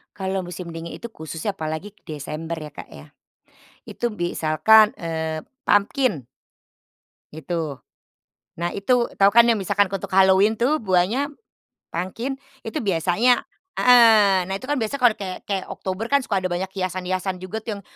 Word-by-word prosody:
Kalau 190 -1 -2
musim 175 0 -7
dingin 165 +1 -6
itu 235 - -6
khususnya 165 0 -5
apalagi 160 +5 -5
ke - - -33
Desember 155 +2 -6
ya, 155 - -7
Kak, - - -10
ya. - - -12 0.8
Itu 240 - -3
misalkan, 210 +3 +4
eee, 160 -1 -4 0.2
pumpkin 205 - +1 1.1
gitu. 160 -2 -4 0.8
Nah, 170 +1 -2
itu 240 +4 +2
tahu 200 0 +5
kan 235 +2 +7
yang 235 -1 +4
misalkan 205 +2 +2
untuk 195 0 -5
Halloween 190 +3 +4
tuh 275 +7 +1
buahnya 210 +9 +1 0.6
pumpkin 230 +10 -4 0.2
itu 225 - -4
biasanya 195 +5 +2 0.3
heeh. 215 -7 +6
Nah, 190 - -3
itu - - -18
kan 290 0 -1
biasa 220 +3 -2
kalau 245 -4 +4
kayak 190 -3 -7
kayak 195 -2 -3
Oktober 190 +4 -4
kan 280 +1 +2
suka 200 -5 0
ada 185 - -2
banyak 180 +2 -3
hiasan-hiasan 185 0 -3
juga 185 +4 -6
tuh 220 -1 -5
yang - - -11
190 Hz, 155 wpm, -23 LUFS, 175-220 Hz, 1.1 s, kan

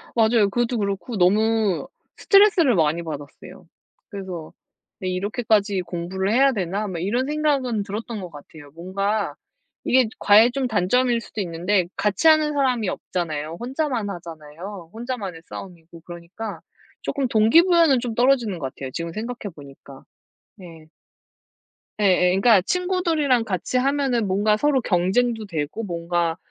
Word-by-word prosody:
맞아요. 220 -3 +3
그것도 240 +3 -1
그렇고 200 +2 -3
너무 215 +3 +2 0.3
스트레스를 385 - +4
많이 165 0 +1
받았어요. 145 -3 -9 0.4
그래서 185 -6 -7 0.5
'왜 185 - -3
이렇게까지 205 0 0
공부를 185 +3 -3
해야 270 +3 +4
되나?' 200 +1 -2
막 175 -3 -5
이런 235 +8 0
생각은 275 -7 0
들었던 215 +1 -6
것 180 - -7
같아요. 145 0 -13
뭔가 195 +5 -2 0.5
이게 255 -2 +3
과외의 220 +4 +6
좀 265 0 -1
단점일 235 +3 +1
수도 220 - -9
있는데 180 +1 0
같이 205 - +1
하는 310 -1 +5
사람이 255 -7 +1
없잖아요. 160 -3 -4
혼자만 255 -4 -2
하잖아요 170 +1 -9
혼자만의 225 -8 -5
싸움이고. 170 -2 -11
그러니까 175 +2 -8 0.4
조금 275 -2 -2
동기부여는 315 - +4
좀 235 -2 -4
떨어지는 240 -7 +2
것 135 -2 -5
같아요, 135 -1 -7
지금 170 0 -4
생각해 220 -2 -6
보니까. 140 -1 -14 0.5
네. 165 -5 -13 1.1
예예. 185 -3 +4
그니까 195 +1 +4
친구들이랑 330 - +1
같이 190 +4 -2
하면은 265 -4 +1
뭔가 205 +3 +2
서로 280 0 +2
경쟁도 220 +5 +1
되고 160 +6 -4
뭔가 170 -2 -2
205 Hz, 335 characters per minute, -22 LUFS, 175-245 Hz, 1.1 s, 과외의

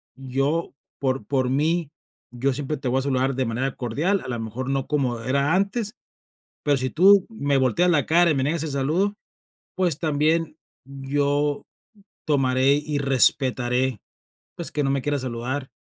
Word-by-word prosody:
yo 135 +5 -2 0.3
por 135 -1 -1
por 130 -3 0
mí, 155 +3 0 0.4
yo 130 +3 -1
siempre 145 +3 -3
te 135 -1 -5
voy 130 +2 +1
a - - -1
saludar 135 -1 0
de 130 0 0
manera 125 +3 -2
cordial, 150 - -1
a - - -6
la 120 -2 -3
mejor 115 +4 -5
no 135 -1 -1
como 130 -6 -1
era 140 +5 +1
antes, 205 +3 -1 0.7
pero 145 -1 +3
si 130 0 -1
tú 195 +3 +5
me 145 -11 -1
volteas 135 +8 +2
la 150 -5 +2
cara 170 +1 +4
y - - +1
me 135 - 0
niegas 155 +3 0
el 160 - -3
saludo, 160 +10 0 0.6
pues, 175 -6 +1
también 160 +1 0 0.3
yo 140 +2 -1 0.6
tomaré 135 -2 +3
y 150 0 -2
respetaré, 130 -2 +2 0.6
pues, 170 - -4
que 150 - -1
no 135 - +1
me 140 -1 0
quiera 145 -1 0
saludar, 130 +2 -4
140 Hz, 165 wpm, -23 LUFS, 130-155 Hz, 0.7 s, tú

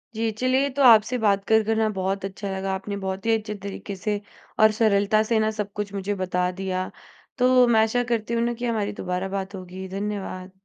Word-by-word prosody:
जी, 225 0 0
चलिए 255 +5 +1
तो 280 - +3
आपसे 230 +1 +6
बात 200 -1 +3
कर 220 0 +5
कर 220 +1 0
ना 220 - +3
बहुत 195 +1 -1
अच्छा 195 +1 -5
लगा। 190 0 -2
आपने 200 +1 -5
बहुत 190 +1 -4
ही 225 0 +4
अच्छे 210 -1 -6
तरीके 200 0 -6
से 205 +2 -2 0.4
और 215 - +7
सरलता 215 -1 +3
से 230 -2 +3
ना 215 0 +1
सब 205 -1 -2
कुछ 205 -1 -6
मुझे 200 +1 -2
बता 180 0 0
दिया। 185 -1 -1 0.6
तो 250 0 +3 0.2
मैं 220 - +6
आशा 225 +3 +1
करती 225 0 -2
हूँ 230 - +1
ना 240 0 0
कि - - -1
हमारी 215 -3 -1
दोबारा 180 +1 -2
बात 195 +1 -5
होगी। 185 0 -8
धन्यवाद। 195 -2 -4
205 Hz, 215 wpm, -24 LUFS, 190-220 Hz, 0.6 s, और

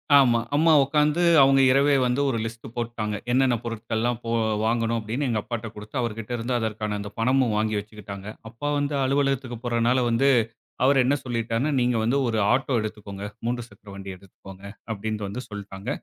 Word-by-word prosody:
ஆமா. 120 -4 +5 0.2
அம்மா 160 +2 +5
உட்காந்து 150 +4 +2 0.2
அவங்க 135 0 +5
இரவே 140 +1 +4
வந்து, 125 +3 +1
ஒரு 115 - -1
லிஸ்ட் 115 0 -7
போட்டுட்டாங்க. 115 -3 -3 0.2
என்னென்ன 130 -1 +3
பொருட்கள்லாம் 115 +1 -2
போ - - -3 0.4
வாங்கணும் 115 0 +1
அப்பிடீன்னு, 120 +6 -2
எங்க 110 -3 0
அப்பாட்ட 115 0 -5
குடுத்து, 105 +3 -10
அவர்கிட்ட 115 0 -4
இருந்து 120 +2 -3
அதற்கான 105 -1 -2
அந்த 100 0 -6
பணமும் 125 -2 +2
வாங்கி 110 0 0
வச்சுக்கிட்டாங்க. 100 -1 -9 0.2
அப்பா 125 +6 -4
வந்து 145 0 -1
அலுவலகத்துக்கு 135 -2 0
போறனால 120 +1 +2
வந்து 130 +4 +3 0.6
அவர் 135 0 +5
என்ன 140 +2 +3
சொல்லிட்டார்ன்னா, 115 +3 -1
"நீங்க 120 0 +2
வந்து 120 +5 +2
ஒரு 110 -2 0
ஆட்டோ 135 -2 +1
எடுத்துக்கோங்க. 105 -2 -7 0.2
3 120 -1 -2
சக்கர 100 -1 -17
வண்டி 100 0 -8
எடுத்துக்கோங்க" 95 +1 -14 0.3
அப்டின்ட்டு 105 0 -4
வந்து 125 +6 -5
சொல்லிட்டாங்க. 100 -1 -7
115 Hz, 165 wpm, -25 LUFS, 105-130 Hz, 0.6 s, ஆமா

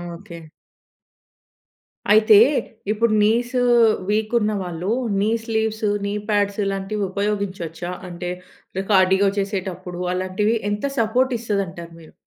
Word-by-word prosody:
Okay. 170 -1 -11 1.7
అయితే, 215 -1 +7 0.5
ఇప్పుడు 220 +1 +1
నీసు 240 +4 +1 0.5
వీక్ 215 +1 0
ఉన్న 215 -1 0
వాళ్ళు 180 +1 -4 0.3
నీ 210 - +1
స్లీవ్స్, 220 -1 -2 0.2
నీ 200 - -2 0.2
పాడ్స్ 205 -1 +1
ఇలాంటివి 195 +1 -2
ఉపయోగించొచ్చా? 190 -4 -3 0.2
అంటే, 175 0 -6 0.5
రే 190 - -1
కార్డియో 190 0 +4
చేసేటప్పుడు 185 -3 -4
అలాంటివి 185 +4 0 0.2
ఎంత 205 +4 -3 0.2
సపోర్ట్ 250 +4 +1
ఇస్తాదంటారు 190 -7 -4
మీరు? 160 - -16
200 Hz, 110 wpm, -21 LUFS, 185-215 Hz, 1.7 s, అయితే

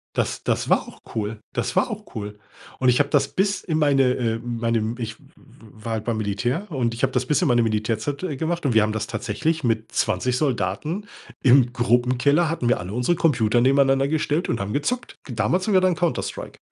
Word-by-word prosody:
Das - - -1
das - - 0
war - - +2
auch - - -16
cool. 110 0 -3
Das - - -2
war - - +3
auch - - -8
cool. 105 -1 -5 0.4
Und 130 - +3
ich 125 +3 +3
habe 145 - +2
das 140 -2 +2
bis 195 +1 0
in 160 -4 -1
meine, 145 -3 +3
äh, 115 -2 -1
meinem 115 -1 -1
ich 110 -2 -5
w - - -22 0.6
war 115 - -2
halt 110 -1 -3
beim 115 -2 -1
Militär, 110 - -2
und 125 -7 -1
ich 115 - -6
habe 135 -1 +2
das 125 0 0
bis 150 +6 +1
in 180 - +2
meine 120 -3 +3
Militärzeit, 110 +5 -1
äh, 165 -6 -2
gemacht, 165 +3 -2
und 130 - +2
wir 110 - +5
haben 105 - 0
das 110 0 -3
tatsächlich 155 +10 -2
mit 115 -2 -1
20 125 -1 0
Soldaten 145 - -2 0.3
im 125 -1 +5
Gruppenkeller 125 +7 +2
hatten 160 -7 -2
wir 125 - +2
alle 90 +3 -6
unsere 125 +9 +1
Computer 120 -9 +2
nebeneinander 135 +1 +3
gestellt 155 +1 0
und 115 - 0
haben 100 +2 -3
gezockt. 240 - -2
Damals 120 - 0
haben 210 - +1
wir 185 - +5
dann 185 -1 +2
Counter-Strike 175 -1 -3
125 Hz, 210 wpm, -23 LUFS, 115-150 Hz, 0.6 s, wir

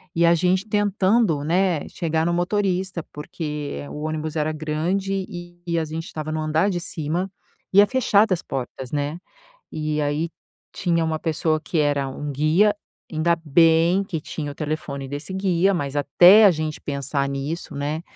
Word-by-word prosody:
E 170 - +4
a 170 0 +5
gente 185 +4 +1
tentando, 205 -4 +2
né, 175 0 +1
chegar 160 -1 -1
no 170 - +1
motorista, 185 0 0
porque 150 -1 -5
o 150 - -7
ônibus 155 0 -3
era 155 0 0
grande 180 +6 -2 0.4
e 170 -1 0
a 160 - -1
gente 160 +1 -5
estava 155 0 -6
no 155 - -2
andar 155 +5 +1
de 175 -3 -1
cima 170 +5 -3 0.4
e 200 - +7
é - - +6
fechada 220 -5 +3
as 175 - -2
portas, 130 -1 -6
né, 145 +2 -2 0.6
e 155 -1 -2
aí 150 +3 -1 0.4
tinha 170 -2 0
uma 160 -1 -1
pessoa 155 -1 0
que 165 0 -3
era 145 -2 +1
um 145 +2 -5
guia, 160 +9 +3 0.4
ainda 170 +2 +2
bem 165 +4 +4
que 185 -5 -4
tinha 150 -2 -5
o - - -13
telefone 145 -2 -4
desse 145 +6 -6
guia, 190 0 +2
mas 145 -3 -3
até 180 +9 +7
a - - +8
gente 155 -2 -3
pensar 140 0 -2
nisso, 140 +3 -4
né, 150 +3 -3
160 Hz, 170 wpm, -23 LUFS, 150-180 Hz, 0.6 s, a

